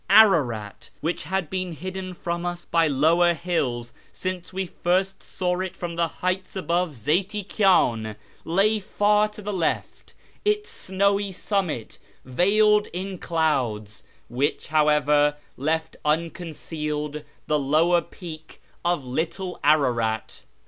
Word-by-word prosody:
Ararat 145 - +4
(which 165 +2 -2
had 190 +1 -1
been 185 +1 -3
hidden 185 +3 -6
from 170 0 -3
us 175 0 -4
by 165 -1 +3
lower 165 +5 +4
hills 125 -9 -2 0.2
since 185 -1 -4
we 190 0 -2
first 185 +3 0
saw 180 -1 -2
it 185 -1 -3
from 175 -1 -5
the 170 0 +2
heights 185 +4 -3
above 175 -2 0
Zeyti 180 - 0
Kyan) 120 - +2 0.3
lay 200 +6 +2
far 210 +1 +2
to 210 0 -11
the 205 +1 -3
left, 175 -4 -2 0.3
its 420 0 0
snowy 200 +1 0
summit 185 - -2 0.3
veiled 210 +10 +4
in 185 +1 -5
clouds, 125 - -1 0.3
which, 140 +6 -1
however, 150 -1 +4 0.2
left 160 +3 -1
unconcealed 150 -2 -2 0.2
the 150 -1 +1
lower 160 +5 +3
peak 160 -4 -10 0.2
of 175 -5 0
little 165 +8 -3
Ararat. 120 -7 +2
170 Hz, 120 wpm, -25 LUFS, 150-190 Hz, 0.3 s, Ararat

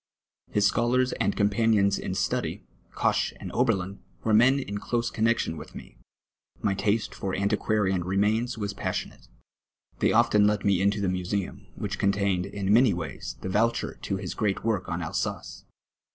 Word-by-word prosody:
His 105 -1 +2
scholars 120 +5 +2
and - - +1
companions 105 -1 +3
in 95 - -4
study, 95 - -1 0.3
Koch - - +1
and - - -7
Oberlin, 100 -6 0 0.2
were 110 - +1
men 125 +5 +6
in 105 -7 -4
close 120 +2 -1
connexion 115 -6 +1
M'ith - - -10
me. - - -11 0.6
My 100 - +1
taste 105 +2 0
for 95 -1 -3
anti 100 +2 +1
quarian 95 -4 0
remains 105 +6 0
was 100 -2 -3
passionate. 100 - -4 0.7
They - - +3
often 110 -3 +4
let 105 -1 0
me 100 -2 +3
into 100 +1 +1
the 100 - +1
museum, 90 +1 -3
which - - -4
contained, 100 -2 +1
in 100 0 -1
many 120 -1 +5
M 85 - -3
ays, 75 -5 -7
the 95 - -4
vouchers 115 +4 0
to - - -2
his - - -5
great 100 -3 -1
work 105 -5 0
on - - -2
Alsace. - - -4
100 Hz, 165 wpm, -27 LUFS, 95-115 Hz, 0.7 s, men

